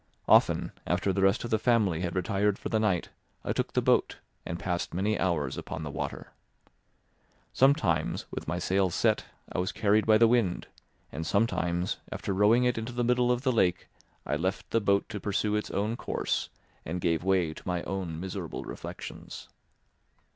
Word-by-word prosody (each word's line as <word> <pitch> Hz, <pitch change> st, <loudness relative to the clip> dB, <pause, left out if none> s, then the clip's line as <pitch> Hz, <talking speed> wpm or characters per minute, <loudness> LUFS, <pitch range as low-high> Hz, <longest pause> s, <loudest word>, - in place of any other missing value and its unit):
Often, -, -, +4 dB, 0.2 s
after 95 Hz, +2 st, +1 dB
the 95 Hz, -, 0 dB
rest 95 Hz, +4 st, +3 dB
of 120 Hz, -, -5 dB
the 110 Hz, -, +3 dB
family 110 Hz, -9 st, +2 dB
had 90 Hz, -1 st, -3 dB
retired 100 Hz, +2 st, +1 dB
for -, -, -5 dB
the 110 Hz, -, +1 dB
night, 95 Hz, -5 st, +1 dB, 0.4 s
I -, -, 0 dB
took -, -, -2 dB
the -, -, +1 dB
boat -, -, +2 dB, 0.3 s
and 85 Hz, -, -3 dB
passed 85 Hz, -1 st, -3 dB
many 105 Hz, +3 st, 0 dB
hours 75 Hz, -7 st, 0 dB
upon -, -, -6 dB
the 75 Hz, -, -5 dB
water. 70 Hz, -, -5 dB, 1.2 s
Sometimes, 130 Hz, -, +2 dB
with -, -, -6 dB
my 90 Hz, -, -1 dB
sails 95 Hz, 0 st, +1 dB
set, -, -, +2 dB, 0.3 s
I -, -, -2 dB
was 90 Hz, -, 0 dB
carried 110 Hz, 0 st, +2 dB
by 110 Hz, -1 st, +7 dB
the 115 Hz, +1 st, +6 dB
wind; 115 Hz, -7 st, +1 dB, 0.5 s
and 80 Hz, -, -4 dB
sometimes, 90 Hz, -2 st, 0 dB
after 100 Hz, -, -3 dB
rowing 105 Hz, +5 st, +4 dB
into 120 Hz, -1 st, 0 dB
the 120 Hz, 0 st, -1 dB
middle 125 Hz, 0 st, +3 dB
of 125 Hz, +1 st, 0 dB
the 130 Hz, -, +3 dB
lake, 90 Hz, -7 st, +1 dB, 0.4 s
I 75 Hz, -, 0 dB
left 95 Hz, +5 st, -3 dB
the 115 Hz, -, +2 dB
boat 100 Hz, -1 st, +2 dB
to 105 Hz, -, -5 dB
pursue 105 Hz, +1 st, 0 dB
its 105 Hz, -, -2 dB
own 105 Hz, +3 st, -1 dB
course -, -, -2 dB, 0.3 s
and 90 Hz, +3 st, -4 dB
gave 85 Hz, -1 st, 0 dB
way 90 Hz, -4 st, +2 dB
to -, -, -12 dB
my 90 Hz, -1 st, -1 dB
own 90 Hz, -5 st, -4 dB
miserable 95 Hz, -2 st, -5 dB
reflections. -, -, -8 dB
95 Hz, 180 wpm, -29 LUFS, 90-110 Hz, 1.2 s, by